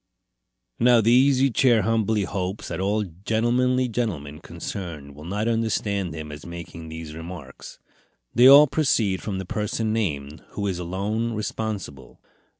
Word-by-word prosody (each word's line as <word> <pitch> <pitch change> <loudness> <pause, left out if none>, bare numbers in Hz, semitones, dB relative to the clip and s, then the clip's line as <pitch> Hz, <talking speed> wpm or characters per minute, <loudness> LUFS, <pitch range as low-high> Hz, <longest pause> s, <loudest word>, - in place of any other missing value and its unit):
Now 120 0 +5
the 115 +1 +3
Easy 135 +1 +4
Chair 120 -2 +3
humbly 110 -2 +1
hopes 95 +2 -4
that 85 - -4
all 105 +3 +1
gentlemanly 120 +8 0
gentlemen 85 -12 -3
concerned 80 -8 -7
will 75 +2 -12
not 105 +5 -2
understand 105 -6 -1
him 75 -1 -7
as 75 0 -9
making 85 -1 -9
these 80 -1 -7
remarks. 80 -4 -9 0.6
They 120 +2 +7
all 140 +2 +10
proceeded 120 -10 +1
from 100 -3 -4
the 95 - -5
person 110 +3 -2
named, 75 -9 -3
who 100 - -3
is 95 -3 -2
alone 100 +6 -2
responsible. 105 -9 -5
100 Hz, 145 wpm, -24 LUFS, 85-115 Hz, 0.6 s, all